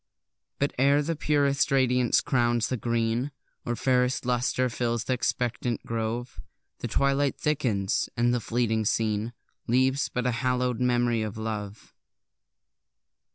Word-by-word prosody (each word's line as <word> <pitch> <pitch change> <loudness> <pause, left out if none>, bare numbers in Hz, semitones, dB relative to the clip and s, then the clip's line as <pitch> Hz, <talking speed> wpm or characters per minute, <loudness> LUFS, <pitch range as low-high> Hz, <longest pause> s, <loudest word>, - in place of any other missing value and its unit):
But 140 - 0
ere 140 +2 +4
the 165 +2 -2
purest 145 -2 +1
radiance 125 -2 +3
crowns 120 -3 +1
the 130 - 0
green, 115 +2 -1 0.4
Or 120 - 0
fairest 125 0 +1
lustre 125 +1 +1
fills 120 -1 -1
th' - - -3
expectant 120 -1 -1
grove, 115 -3 -3 0.4
The - - -3
twilight 140 0 +1
thickens, 120 -11 0
and 120 +1 +3
the 125 - +1
fleeting 115 -1 0
scene 110 +1 0 0.3
Leaves 130 +3 +2
but 125 0 -3
a 125 - +2
hallow'd 125 -1 0
memory 120 -2 +2
of 110 -1 -4
love! 110 -1 -6
120 Hz, 130 wpm, -27 LUFS, 115-130 Hz, 0.4 s, ere